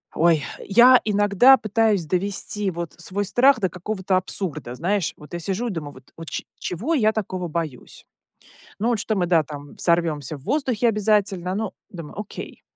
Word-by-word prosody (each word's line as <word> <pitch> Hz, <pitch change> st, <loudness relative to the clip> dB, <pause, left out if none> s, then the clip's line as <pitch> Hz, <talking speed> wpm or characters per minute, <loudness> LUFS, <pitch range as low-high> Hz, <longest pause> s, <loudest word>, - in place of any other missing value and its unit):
Ой, 165 Hz, -2 st, +3 dB, 0.2 s
я 245 Hz, +5 st, +6 dB
иногда 205 Hz, +5 st, +5 dB
пытаюсь 215 Hz, -4 st, +1 dB
довести 195 Hz, +3 st, -1 dB
вот 170 Hz, -1 st, -6 dB
свой 185 Hz, +4 st, -3 dB
страх 250 Hz, +6 st, +4 dB
до 190 Hz, -4 st, 0 dB
какого-то 190 Hz, +2 st, -2 dB
абсурда. 185 Hz, -8 st, -4 dB
Знаешь, 180 Hz, +5 st, -1 dB
вот 150 Hz, +3 st, -14 dB
я 175 Hz, -, -3 dB
сижу 195 Hz, +7 st, -2 dB
и -, -, -1 dB
думаю 150 Hz, -5 st, -6 dB
вот: 130 Hz, -1 st, -17 dB
"Вот 165 Hz, -1 st, -8 dB
чё -, -, -4 dB
чего 220 Hz, -, -3 dB
я 220 Hz, -8 st, +3 dB
такого 185 Hz, -4 st, -3 dB
боюсь?". 155 Hz, -6 st, -6 dB, 0.7 s
Ну, 225 Hz, -, 0 dB
вот 235 Hz, -2 st, +1 dB
что 215 Hz, +1 st, -2 dB
мы, 180 Hz, -2 st, +1 dB
да, 170 Hz, -2 st, +4 dB
там 145 Hz, -1 st, -10 dB
взорвемся 160 Hz, -4 st, 0 dB
в -, -, -18 dB
воздухе 250 Hz, -, 0 dB
обязательно. 205 Hz, -4 st, +1 dB
Ну, 210 Hz, -1 st, -3 dB, 0.2 s
думаю: 165 Hz, -1 st, -9 dB
"Окей. 210 Hz, -, -8 dB
190 Hz, 175 wpm, -23 LUFS, 170-215 Hz, 0.7 s, я